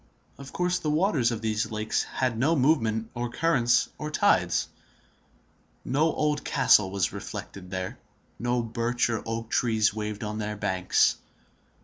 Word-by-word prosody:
Of 135 Hz, -1 st, -10 dB
course 180 Hz, 0 st, 0 dB
the 155 Hz, -, -2 dB
waters 150 Hz, -, +2 dB
of 115 Hz, -1 st, -4 dB
these 110 Hz, 0 st, -1 dB
lakes 110 Hz, -1 st, -1 dB
had 130 Hz, -3 st, -1 dB
no 140 Hz, +9 st, +2 dB
movement 115 Hz, -6 st, +1 dB
of 120 Hz, 0 st, -3 dB
currents 125 Hz, -8 st, +2 dB
or 150 Hz, -, -4 dB
tides; -, -, +2 dB, 1.2 s
no 150 Hz, +5 st, +2 dB
old 150 Hz, -1 st, -1 dB
castle 105 Hz, -7 st, +4 dB
was 95 Hz, -1 st, -1 dB
reflected 90 Hz, -2 st, -7 dB
there; 95 Hz, 0 st, -5 dB, 0.4 s
no 120 Hz, +1 st, 0 dB
birch 115 Hz, +1 st, -1 dB
or 115 Hz, -, -2 dB
oak 115 Hz, 0 st, -4 dB
trees 110 Hz, -4 st, +2 dB
waved 105 Hz, -1 st, -4 dB
on 105 Hz, 0 st, -4 dB
their 105 Hz, 0 st, -3 dB
banks. 95 Hz, -3 st, +2 dB
115 Hz, 145 wpm, -27 LUFS, 105-135 Hz, 1.2 s, castle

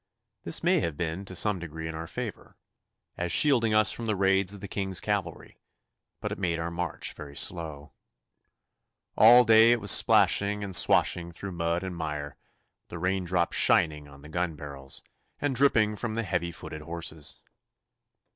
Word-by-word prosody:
This -, -, -1 dB
may -, -, +3 dB
have 80 Hz, -3 st, -3 dB
been 85 Hz, +3 st, -4 dB
to 95 Hz, -, -6 dB
some 105 Hz, +1 st, +1 dB
degree 80 Hz, -1 st, -7 dB
in 80 Hz, -, -5 dB
our 80 Hz, +1 st, -6 dB
favour, 115 Hz, +2 st, -7 dB, 0.6 s
as 85 Hz, 0 st, -2 dB
shielding 120 Hz, -, +3 dB
us 110 Hz, 0 st, +5 dB
from 115 Hz, -, -5 dB
the 110 Hz, -, 0 dB
raids 95 Hz, 0 st, +2 dB
of 100 Hz, -, -10 dB
the 100 Hz, -, -7 dB
King's 95 Hz, -2 st, -3 dB
cavalry, 100 Hz, -6 st, -4 dB, 0.6 s
but -, -, -4 dB
it -, -, -5 dB
made 85 Hz, -2 st, -1 dB
our 85 Hz, +1 st, -4 dB
march 85 Hz, -1 st, -4 dB
very 70 Hz, -1 st, -11 dB
slow. 75 Hz, -3 st, -3 dB, 1.2 s
All 120 Hz, +3 st, +8 dB
day 110 Hz, +1 st, +6 dB
it 120 Hz, -, -1 dB
was 100 Hz, -2 st, +2 dB
splashing 105 Hz, -1 st, +3 dB
and 95 Hz, -2 st, -3 dB
swashing 85 Hz, -1 st, +3 dB
through 95 Hz, +3 st, -7 dB
mud 85 Hz, +1 st, -2 dB
and 95 Hz, -2 st, -5 dB
mire, 75 Hz, -3 st, -5 dB, 0.5 s
the 85 Hz, -, -8 dB
rain 90 Hz, +2 st, -1 dB
drops 85 Hz, -1 st, 0 dB
shining 75 Hz, -2 st, +2 dB
on 70 Hz, 0 st, -16 dB
the 75 Hz, -, -12 dB
gun 85 Hz, 0 st, -2 dB
barrels 70 Hz, -2 st, -9 dB, 0.4 s
and 145 Hz, -2 st, -1 dB
dripping 110 Hz, -5 st, +3 dB
from 110 Hz, 0 st, -4 dB
the 115 Hz, -, -1 dB
heavy 85 Hz, -3 st, -2 dB
footed 75 Hz, -1 st, -8 dB
horses. 80 Hz, -2 st, -5 dB
90 Hz, 175 wpm, -27 LUFS, 80-105 Hz, 1.2 s, All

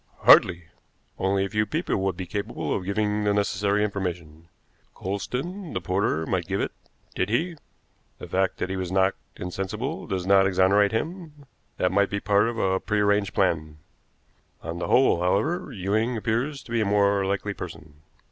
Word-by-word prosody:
Hardly! 90 Hz, -1 st, +6 dB, 0.6 s
Only 95 Hz, +1 st, +1 dB
a -, -, -5 dB
few 105 Hz, 0 st, +1 dB
people 165 Hz, +4 st, -1 dB
would 95 Hz, -2 st, -1 dB
be 95 Hz, -, -4 dB
capable 100 Hz, +5 st, -3 dB
of 95 Hz, -, -4 dB
giving 105 Hz, +1 st, 0 dB
the 105 Hz, 0 st, +2 dB
necessary 100 Hz, 0 st, +1 dB
information. 85 Hz, -6 st, -4 dB, 0.5 s
Coulsdon, 140 Hz, -, -4 dB
the -, -, -1 dB
porter, 90 Hz, -4 st, 0 dB
might 90 Hz, -2 st, -1 dB
give 95 Hz, +1 st, -1 dB
it. -, -, -1 dB, 0.4 s
Did 95 Hz, -, -1 dB
he? 165 Hz, +10 st, 0 dB, 0.6 s
The -, -, -9 dB
fact 95 Hz, 0 st, 0 dB
that 95 Hz, -, -3 dB
he 95 Hz, -, -2 dB
was 95 Hz, -1 st, -3 dB
knocked 95 Hz, 0 st, +2 dB, 0.2 s
insensible 100 Hz, -, -4 dB
does 95 Hz, -2 st, -2 dB
not 95 Hz, 0 st, +5 dB
exonerate 95 Hz, +2 st, +3 dB
him; 155 Hz, +3 st, -5 dB, 0.3 s
that 90 Hz, -, +1 dB
might 100 Hz, +1 st, +2 dB
be 100 Hz, -, -2 dB
part 100 Hz, +1 st, +3 dB
of 115 Hz, 0 st, -3 dB
a 95 Hz, -3 st, +1 dB
prearranged 105 Hz, -2 st, +1 dB
plan. 80 Hz, -5 st, 0 dB, 0.9 s
On 85 Hz, +1 st, -5 dB
the -, -, -3 dB
whole, 125 Hz, -9 st, +4 dB
however, 125 Hz, -, 0 dB
Ewing 110 Hz, +3 st, -1 dB
appears 120 Hz, +7 st, -1 dB
to -, -, -13 dB
be 115 Hz, -1 st, +1 dB
a -, -, +1 dB
more 100 Hz, -1 st, +3 dB
likely 100 Hz, +1 st, -1 dB
person. 80 Hz, -5 st, -10 dB
100 Hz, 170 wpm, -25 LUFS, 95-110 Hz, 0.9 s, Hardly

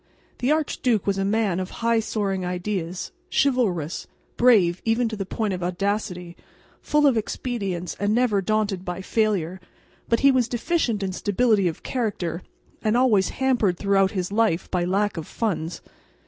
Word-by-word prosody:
The 255 Hz, +3 st, +1 dB
archduke 255 Hz, -, +1 dB
was 195 Hz, -1 st, 0 dB
a -, -, +1 dB
man 200 Hz, -3 st, +1 dB
of 185 Hz, -, -3 dB, 0.2 s
high 230 Hz, -1 st, +4 dB
soaring 200 Hz, -4 st, -2 dB
ideas, 180 Hz, -1 st, -3 dB, 0.2 s
chivalrous, 200 Hz, -, +1 dB, 0.3 s
brave 200 Hz, -8 st, +4 dB
even 230 Hz, +1 st, +1 dB
to 220 Hz, -, -4 dB
the 195 Hz, -2 st, -5 dB
point 215 Hz, -2 st, -1 dB
of 180 Hz, -, -4 dB
audacity, 180 Hz, -1 st, -2 dB, 0.5 s
full 300 Hz, 0 st, +2 dB
of 265 Hz, -5 st, +4 dB
expedients 200 Hz, -6 st, -3 dB
and 205 Hz, +1 st, +1 dB
never 235 Hz, -5 st, +2 dB
daunted 205 Hz, -2 st, 0 dB
by 180 Hz, 0 st, -5 dB
failure, 190 Hz, -5 st, 0 dB, 0.5 s
but 230 Hz, -, +2 dB
he 275 Hz, -, +6 dB
was 255 Hz, -3 st, +2 dB
deficient 240 Hz, -, 0 dB
in 190 Hz, -, -1 dB
stability 205 Hz, +1 st, +2 dB
of 165 Hz, -, -4 dB
character, 205 Hz, -8 st, -2 dB, 0.4 s
and 220 Hz, +2 st, +2 dB
always 220 Hz, -7 st, +3 dB
hampered 245 Hz, -9 st, +1 dB
throughout 195 Hz, 0 st, +3 dB
his 185 Hz, -2 st, -3 dB
life 215 Hz, -5 st, +1 dB
by 175 Hz, -1 st, +1 dB
lack 200 Hz, +2 st, 0 dB
of 160 Hz, -, -5 dB
funds. 175 Hz, -7 st, -3 dB
205 Hz, 160 wpm, -24 LUFS, 180-230 Hz, 0.5 s, he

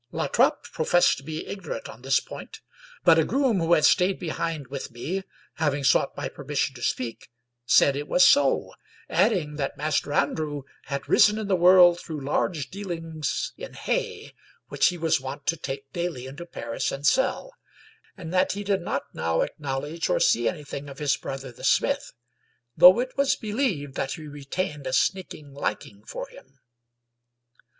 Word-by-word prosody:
La -, -, -2 dB
Trape -, -, +2 dB
professed 175 Hz, +2 st, +3 dB
to -, -, -10 dB
be 155 Hz, +2 st, -5 dB
ignorant 195 Hz, -, -6 dB
on 110 Hz, +2 st, -12 dB
this 135 Hz, +1 st, +2 dB
point, -, -, -10 dB, 0.4 s
but 165 Hz, -2 st, +6 dB
a -, -, +4 dB
groom 255 Hz, -, +1 dB
who 165 Hz, 0 st, +2 dB
had 155 Hz, -3 st, +4 dB
stayed 185 Hz, +1 st, +4 dB
behind 165 Hz, -3 st, -3 dB
with 135 Hz, +1 st, -6 dB
me, 150 Hz, +11 st, -4 dB, 0.4 s
having 145 Hz, -3 st, 0 dB
sought 135 Hz, -, +2 dB
my -, -, -3 dB
permission 140 Hz, -1 st, -2 dB
to 125 Hz, -, -12 dB
speak, 120 Hz, -1 st, -3 dB, 0.4 s
said 140 Hz, +2 st, +5 dB
it 145 Hz, +1 st, -4 dB
was 180 Hz, -, +5 dB
so, 140 Hz, -2 st, +3 dB, 0.4 s
adding 175 Hz, -7 st, +1 dB
that 140 Hz, -2 st, -3 dB
Master 150 Hz, -1 st, -1 dB
Andrew 145 Hz, 0 st, -1 dB, 0.2 s
had 140 Hz, 0 st, -4 dB
risen 210 Hz, 0 st, +5 dB
in 215 Hz, -2 st, -4 dB
the 195 Hz, -, +2 dB
world 175 Hz, -1 st, +7 dB
through 160 Hz, -3 st, -6 dB
large 145 Hz, -1 st, -1 dB
dealings 165 Hz, -6 st, -4 dB
in -, -, -9 dB
hay, -, -, -3 dB, 0.4 s
which -, -, +3 dB
he 180 Hz, -, -1 dB
was 160 Hz, -4 st, +1 dB
wont 130 Hz, 0 st, -7 dB
to 165 Hz, -, +1 dB
take 135 Hz, -2 st, -7 dB
daily 170 Hz, -7 st, -3 dB
into 145 Hz, +6 st, -9 dB
Paris 115 Hz, -8 st, -3 dB
and 135 Hz, +1 st, -6 dB
sell, 265 Hz, -, +1 dB, 0.6 s
and 175 Hz, -2 st, -7 dB
that 185 Hz, 0 st, +2 dB
he 205 Hz, +1 st, -5 dB
did 195 Hz, -2 st, 0 dB
not -, -, -2 dB
now 80 Hz, 0 st, 0 dB
acknowledge 145 Hz, +3 st, -3 dB
or -, -, +2 dB
see -, -, +3 dB
anything 145 Hz, -4 st, -7 dB
of 140 Hz, -, -10 dB
his 145 Hz, -1 st, +1 dB
brother 135 Hz, -1 st, -7 dB
the 120 Hz, -, -15 dB
smith, -, -, +1 dB, 0.6 s
though 185 Hz, +5 st, +8 dB
it 255 Hz, +1 st, -3 dB
was 280 Hz, 0 st, +3 dB
believed 210 Hz, -, -2 dB
that 135 Hz, -, -2 dB
he 155 Hz, -3 st, -8 dB
re 145 Hz, -1 st, -10 dB
tained 150 Hz, -3 st, -3 dB
a 130 Hz, -, -3 dB
sneaking 155 Hz, -3 st, -1 dB
liking 105 Hz, -6 st, -4 dB
for -, -, -6 dB
him. 135 Hz, +1 st, -17 dB
155 Hz, 175 wpm, -25 LUFS, 140-180 Hz, 0.6 s, though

